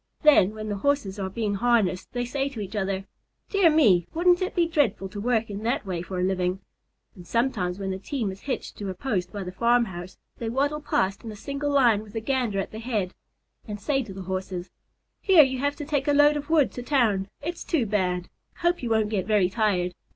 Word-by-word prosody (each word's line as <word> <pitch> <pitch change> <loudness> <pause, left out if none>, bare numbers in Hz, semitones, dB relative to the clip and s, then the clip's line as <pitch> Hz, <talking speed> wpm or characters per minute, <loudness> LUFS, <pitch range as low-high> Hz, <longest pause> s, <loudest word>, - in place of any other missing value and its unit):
Then, 215 -9 +6
when 215 0 -6
the 205 -1 -2
Horses 215 -5 0
are 190 -1 -2
being 210 +1 -2
harnessed, 200 -4 +1
they 245 0 -2
say 270 +3 -1
to 265 -5 -8
each 205 +1 -5
other, 195 -1 -1 0.5
"Dear 395 -4 +5
me! 210 - +4
Wouldn't 355 +2 +4
it 370 - -2
be 345 -2 +3
dreadful 265 -12 +1
to 205 +1 -6
work 225 -1 +1
in 205 0 -6
that 230 0 -1
way 180 -3 -3
for 180 +1 -5
a - - +1
living?" 185 0 0 0.6
And 175 -2 -13
sometimes, 215 -7 0
when 195 -1 -3
the 190 - -4
team 225 -1 -3
is 190 - -11
hitched 270 - -4
to 200 -2 -4
a 185 - -4
post 185 -5 -2
by 205 -2 -5
the 180 - -6
farmhouse, 190 -4 0 0.2
they 230 - -3
waddle 285 +5 0
past 195 -8 0
in 225 - -6
a - - -8
single 280 +7 -3
line 245 -7 +4
with 210 -1 -13
the 225 - -2
Gander 240 -3 -1
at 195 - -3
the 220 - -7
head, 215 -6 -2 0.5
and 210 -1 -5
say 270 +5 0
to 225 -6 -8
the 190 0 -7
Horses: 185 -1 -4 0.5
"Hear 370 -6 +7
you 260 -1 -1
have 285 +2 0
to 295 - -6
take 285 -1 -1
a 290 - +4
load 290 +1 +5
of 290 0 -5
wood 315 -4 +4
to 245 - -6
town. 230 -8 +1 0.2
It's 340 +2 -4
too 300 -9 0
bad. 180 -4 0 0.3
Hope 345 0 +1
you 240 - -3
won't 220 -2 +2
get 195 -3 -1
very 205 -4 +3
tired. 185 -5 +1
220 Hz, 230 wpm, -26 LUFS, 190-275 Hz, 0.6 s, Hear